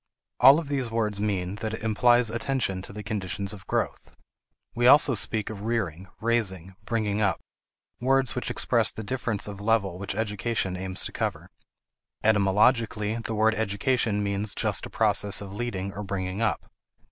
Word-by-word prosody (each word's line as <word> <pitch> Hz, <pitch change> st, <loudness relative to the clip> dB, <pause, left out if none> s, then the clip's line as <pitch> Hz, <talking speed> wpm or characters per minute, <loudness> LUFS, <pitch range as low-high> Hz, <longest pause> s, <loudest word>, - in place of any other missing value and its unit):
All 135 Hz, +3 st, +8 dB
of 165 Hz, -3 st, -3 dB
these 135 Hz, -4 st, -2 dB
words 105 Hz, -3 st, -1 dB
mean 100 Hz, -2 st, -1 dB
that 110 Hz, -1 st, -3 dB
it -, -, -10 dB
implies 120 Hz, +1 st, +3 dB
attention 115 Hz, -5 st, -1 dB
to 95 Hz, -, -8 dB
the 105 Hz, +1 st, -8 dB
conditions 100 Hz, -1 st, -3 dB
of 95 Hz, -2 st, -12 dB
growth. -, -, -3 dB, 0.6 s
We 120 Hz, +1 st, +2 dB
also 140 Hz, 0 st, +7 dB
speak 110 Hz, 0 st, -1 dB
of 100 Hz, -2 st, -8 dB
rearing, 100 Hz, -6 st, -2 dB
raising, 95 Hz, -6 st, -1 dB
bringing 110 Hz, -2 st, -1 dB
up 105 Hz, -3 st, +1 dB, 0.6 s
words 130 Hz, 0 st, +2 dB
which 125 Hz, -, -3 dB
express 115 Hz, -4 st, +1 dB
the 110 Hz, -, -7 dB
difference 115 Hz, -3 st, -2 dB
of 100 Hz, -1 st, -7 dB
level 100 Hz, -4 st, +1 dB
which 100 Hz, 0 st, -4 dB
education 105 Hz, -2 st, -2 dB
aims 95 Hz, 0 st, -3 dB
to -, -, -5 dB
cover. -, -, -4 dB, 0.7 s
Etymologically, 105 Hz, +1 st, +2 dB
the 115 Hz, -1 st, -4 dB
word 110 Hz, +1 st, +3 dB
education 110 Hz, 0 st, 0 dB
means 100 Hz, 0 st, -1 dB
just -, -, 0 dB
a -, -, -14 dB
process 100 Hz, -2 st, +2 dB
of 100 Hz, -1 st, -7 dB
leading 100 Hz, -4 st, -4 dB
or 105 Hz, -, -6 dB
bringing 95 Hz, 0 st, -3 dB
up. 115 Hz, -, 0 dB
105 Hz, 165 wpm, -26 LUFS, 100-115 Hz, 0.7 s, All